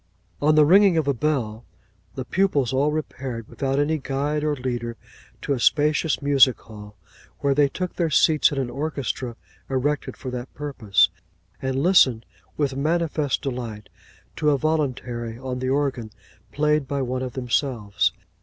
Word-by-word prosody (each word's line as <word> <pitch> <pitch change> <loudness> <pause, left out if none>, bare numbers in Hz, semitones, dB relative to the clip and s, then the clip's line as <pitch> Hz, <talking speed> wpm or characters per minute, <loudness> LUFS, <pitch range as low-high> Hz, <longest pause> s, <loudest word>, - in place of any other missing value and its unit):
On 150 +1 +4
the 155 -1 +6
ringing 190 +2 +6
of 155 -3 +1
a 140 - +3
bell, 120 -5 -1 0.5
the 130 - -4
pupils 145 -8 +1
all 140 +3 +2
repaired, 130 -6 -5
without 135 0 -2
any 150 +2 +1
guide 145 +2 -2
or 150 -1 +1
leader, 120 -3 -4 0.5
to 140 - 0
a 130 - -2
spacious 150 +3 +2
music 140 -3 +5
hall, 105 -1 -12 0.5
where 140 -1 +2
they 145 0 +3
took 180 +5 -4
their 170 -2 0
seats 155 +1 +4
in 145 - -4
an 130 -3 -2
orchestra 135 -4 -3 0.3
erected 135 +2 -1
for 130 - -6
that 125 0 -6
purpose, 110 - +2 0.5
and 130 +1 -1
listened 130 -11 +4 0.3
with 140 -3 0
manifest 155 -1 0
delight 120 -6 -5 0.5
to 150 - +2
a 145 - +3
voluntary 125 -6 -2
on 130 0 -5
the 130 0 -2
organ, 135 -5 -1 0.4
played 150 -1 +1
by 140 0 -1
one 130 0 -2
of 130 -2 -4
themselves. 125 -5 0
135 Hz, 155 wpm, -23 LUFS, 125-150 Hz, 0.5 s, the